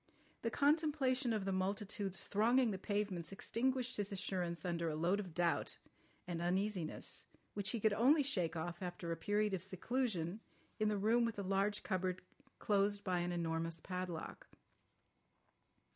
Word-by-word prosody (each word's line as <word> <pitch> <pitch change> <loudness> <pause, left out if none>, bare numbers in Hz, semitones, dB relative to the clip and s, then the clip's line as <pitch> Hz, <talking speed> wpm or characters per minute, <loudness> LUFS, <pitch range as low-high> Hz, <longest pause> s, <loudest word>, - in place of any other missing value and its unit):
The 230 - 0
contemplation 285 -3 +2
of 215 -3 0
the 195 - 0
multitudes 195 +1 -1
thronging 235 +3 +4
the 190 - -3
pavements 200 -4 -2
extinguished 255 +5 0
his 205 -1 -1
assurance 180 -4 -2
under 170 -2 0
a 155 - -2
load 175 +6 +2
of 180 -6 -6
doubt 175 -1 +1 0.5
and 170 -2 -3
uneasiness 185 -1 -1 0.3
which 205 0 -2
he 235 - -1
could 215 0 +3
only 280 +8 +5
shake 180 - 0
off 170 +3 -4
after 175 -2 -4
a - - 0
period 205 +5 +1
of 190 - -1
seclusion 195 -1 -1 0.4
in 215 0 +3
the 210 - +1
room 225 +4 +3
with 230 -1 0
the 200 - -3
large 195 +2 +1
cupboard 185 -2 -1 0.3
closed 205 0 +2
by 185 -3 +1
an 175 0 -1
enormous 165 -1 -1
padlock. 180 -2 -5
195 Hz, 155 wpm, -38 LUFS, 175-220 Hz, 0.5 s, only